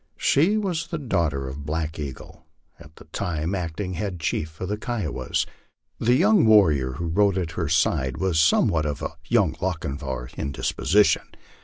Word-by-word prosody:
She 175 +10 +3
was 175 -5 -2
the 170 - -3
daughter 85 - -1
of 70 +2 -7
Black 80 +1 -3
Eagle, 70 -4 -8 0.3
at 75 +1 -15
that 80 - -17
time 85 -3 -2
the 100 - -1
acting 90 +3 -4
head 90 0 -4
chief 80 0 -3
of 95 - -3
the 105 - -1
Kiowas. 105 - -2 0.5
The 120 +2 +3
young 195 +5 +4
warrior 75 -12 +4
who 85 +7 -5
rode 95 +3 +2
at 85 -3 -2
her 80 0 -3
side 75 -5 +1
was 95 -4 +1
somewhat 80 0 +3
of 75 -1 -4
a - - -3
young - - +2
Lochinvar 70 -8 -3
in 70 - -3
disposition. 105 +9 +2
85 Hz, 170 wpm, -24 LUFS, 75-105 Hz, 0.5 s, young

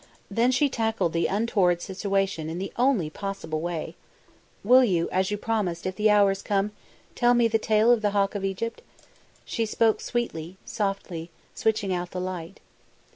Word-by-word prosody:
Then 230 +5 +3
she 255 +3 +3
tackled 225 -9 -1
the 170 0 +1
untoward 195 -4 +2
situation 195 -3 -2
in 165 - -4
the 195 +2 -5
only 240 - +2
possible 175 -5 -4
way. 170 -2 -4 0.7
"Will 250 +5 +7
you, 175 -8 +1
as 185 0 +1
you 205 - -1
promised, 205 -6 -2
if 185 0 -2
the 210 +2 +3
hour 205 -1 +5
is 195 0 -4
come, 200 0 0 0.4
tell 245 -1 +3
me 240 -1 +4
the 225 0 +1
tale 220 +2 +3
of 240 -3 +3
the 210 - +2
Hawk 200 -1 +1
of 200 -2 -4
Egypt?" 195 +4 -3 0.6
She 225 -1 -2
spoke 220 0 +2
sweetly, 185 -8 -3
softly, 195 -5 -3 0.2
switching 210 -3 0
out 175 0 -3
the 180 - -5
light. 180 0 -5
200 Hz, 175 wpm, -26 LUFS, 180-225 Hz, 0.7 s, Will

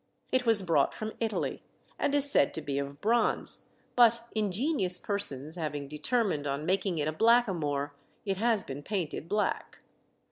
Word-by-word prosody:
It 255 -2 +1
was 220 -4 +5
brought 165 -6 +2
from 215 0 -5
Italy, 225 -2 -2 0.4
and 285 - +1
is 285 0 +4
said 140 - +3
to 160 - -3
be 140 -2 -2
of 140 +1 -6
bronze, 230 +2 +2 0.3
but 235 -1 +5
ingenious 210 - 0
persons 160 -7 -3
having 150 -3 -4
determined 150 - -1
on 140 +2 -3
making 190 -1 0
it 150 -1 0
a - - 0
blackamoor, 160 -10 +2 0.3
it 195 -2 -1
has 225 0 +1
been 135 +1 -7
painted 170 -2 -4
black. 210 0 -1
190 Hz, 155 wpm, -29 LUFS, 150-225 Hz, 0.4 s, was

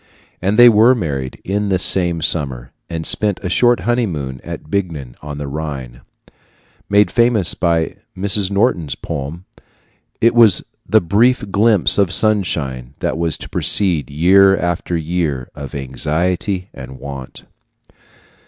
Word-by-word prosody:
And 100 +4 0
they 120 0 +9
were 115 +3 +5
married 70 - -4
in 100 +1 -2
this 95 -1 +1
same 85 -4 +1
summer, 65 -6 -1 0.2
and 80 -1 -5
spent 105 -3 +1
a 95 - -2
short 120 +6 +2
honeymoon 80 - -2
at - - -8
Bingen 80 -11 -3
on 75 -1 -7
the 75 -1 -5
Rhine 70 -4 -6 0.9
made 100 0 +3
famous 115 -7 +2
by 85 -2 -1 0.2
Mrs. 100 0 +1
Norton's 100 - 0
poem. 75 +6 -6 0.7
It 115 +1 +3
was 115 -6 +5 0.3
the 110 +3 +4
brief 105 +4 +1
glimpse 105 - +4
of 95 -3 +2
sunshine 70 - 0
that - - -2
was 85 -2 -2
to - - -10
precede 90 -8 +1
year 95 +6 +4
after 85 0 -2
year 80 -5 -3
of 70 -2 -9
anxiety 85 +8 -2
and 65 0 -10
want. 70 -2 -9
85 Hz, 135 wpm, -17 LUFS, 70-100 Hz, 0.9 s, they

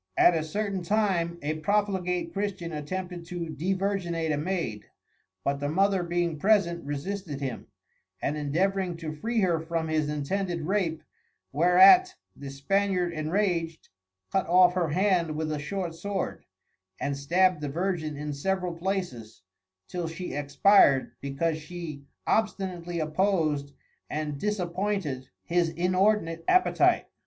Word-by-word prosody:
At 175 - +6
a 165 - +1
certain 200 +4 -2
time 175 -3 0
a 155 +2 -1
profligate 180 -2 0
Christian 195 -4 -3
attempted 175 +3 -5
to 170 -2 -4
devirginate 175 -1 -1
a - - 0
Maid, 155 - -3 0.6
but 140 0 0
the 145 0 -2
Mother 195 +3 +2
being 170 -2 -1
present, 185 -3 +2
resisted 145 +2 -4
him, 135 -4 -5 0.5
and 145 - -1
endeavouring 175 +5 0
to 160 -2 -5
free 225 +9 -1
her 175 -4 +2
from 165 0 -2
his 155 -1 0
intended 170 +4 -2
Rape, 170 -2 -1 0.5
whereat 190 - +6 0.2
the 140 -1 -8
Spaniard 180 +5 0
enrag'd, 165 0 -1 0.4
cut 190 - +1
off 180 +1 +6
her 175 -3 0
Hand 175 -2 +1
with 155 0 -2
a 150 - -2
short 175 +2 -3
Sword, 190 +3 -4 0.5
and 140 0 -1
stab'd 175 +5 +2
the 145 - -3
Virgin 165 -2 -2
in 150 0 -4
several 180 +4 -1
places, 170 - -4 0.4
till 175 -2 -3
she 170 +3 -6
Expir'd, 140 0 +4
because 155 +4 -1
she 155 -3 -8 0.2
obstinately 185 -5 -1
opposed 155 -3 0 0.4
and 150 -2 -3
disappointed 185 -8 -2
his 170 -1 +1
inordinate 180 -1 +1
Appetite. 365 0 +4
170 Hz, 130 wpm, -27 LUFS, 155-190 Hz, 0.6 s, At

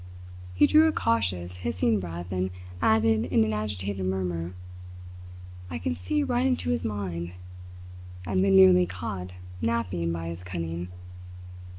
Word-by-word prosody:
He 120 - +6
drew 310 - +6
a - - +3
cautious, 90 - -1
hissing 110 +2 0
breath 85 0 -6
and 95 0 -1 0.3
added 110 0 +3
in 110 - +3
an 110 0 0
agitated 100 -2 -3
murmur: 90 -2 -2 1.1
"I 80 - -4
can 85 0 -2
see 90 - -1
right 250 -2 +1
into 250 - 0
his 120 - -1
mind, 90 -5 -4 0.9
I - - -4
have 95 -1 +2
been 95 0 +4
nearly 90 -2 +7
caught 90 0 -5 0.3
napping 100 -8 -1
by 85 0 -4
his 85 +1 -7
cunning." 85 -1 -4
95 Hz, 145 wpm, -27 LUFS, 90-110 Hz, 1.1 s, nearly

